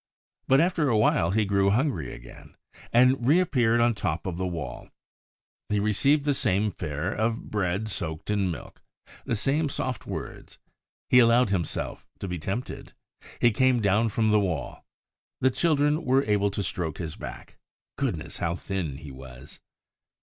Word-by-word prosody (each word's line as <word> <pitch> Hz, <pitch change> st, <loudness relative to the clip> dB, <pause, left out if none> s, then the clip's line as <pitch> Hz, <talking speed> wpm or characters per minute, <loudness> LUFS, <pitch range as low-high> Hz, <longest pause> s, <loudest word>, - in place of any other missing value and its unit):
But 135 Hz, +1 st, +5 dB
after 165 Hz, -3 st, +2 dB
a 115 Hz, -, +3 dB
while 95 Hz, -5 st, +3 dB
he 105 Hz, +3 st, +2 dB
grew 100 Hz, 0 st, +2 dB
hungry 110 Hz, -, 0 dB
again, -, -, -13 dB, 0.4 s
and 125 Hz, +1 st, +4 dB
reappeared 130 Hz, -8 st, +3 dB
on 120 Hz, 0 st, +3 dB
top 90 Hz, -6 st, -3 dB
of 90 Hz, -3 st, -3 dB
the 95 Hz, 0 st, -1 dB
wall. 85 Hz, -4 st, -6 dB, 0.8 s
He 105 Hz, -, +1 dB
received 135 Hz, +8 st, +2 dB
the 145 Hz, -, +3 dB
same 105 Hz, -5 st, +1 dB
fare 75 Hz, +3 st, -3 dB
of 110 Hz, +1 st, -2 dB
bread 100 Hz, +1 st, -1 dB
soaked 80 Hz, -3 st, -4 dB
in 100 Hz, -3 st, +1 dB
milk, 85 Hz, -, -8 dB, 0.4 s
the -, -, 0 dB
same 140 Hz, +7 st, +1 dB
soft 130 Hz, -3 st, -4 dB
words. -, -, -7 dB, 0.5 s
He 125 Hz, -, +8 dB
allowed 120 Hz, -2 st, +4 dB
himself 90 Hz, -5 st, -3 dB
to -, -, -5 dB
be 90 Hz, -1 st, -4 dB
tempted. 105 Hz, +10 st, -5 dB, 0.5 s
He 120 Hz, -, +4 dB
came 130 Hz, +2 st, +3 dB
down 110 Hz, +2 st, +2 dB
from 110 Hz, 0 st, +1 dB
the 105 Hz, -, +5 dB
wall. 90 Hz, -6 st, -3 dB, 0.6 s
The 130 Hz, -, +3 dB
children 150 Hz, +2 st, +1 dB
were 130 Hz, +2 st, +3 dB
able 100 Hz, -3 st, +1 dB
to 100 Hz, 0 st, -3 dB
stroke 85 Hz, -3 st, -3 dB
his 80 Hz, -3 st, -5 dB
back. -, -, -9 dB, 0.4 s
Goodness, 115 Hz, -, -3 dB
how 85 Hz, 0 st, -1 dB
thin 90 Hz, -7 st, -4 dB
he 75 Hz, -2 st, -10 dB
was! 65 Hz, +1 st, -12 dB
105 Hz, 160 wpm, -26 LUFS, 90-125 Hz, 0.8 s, He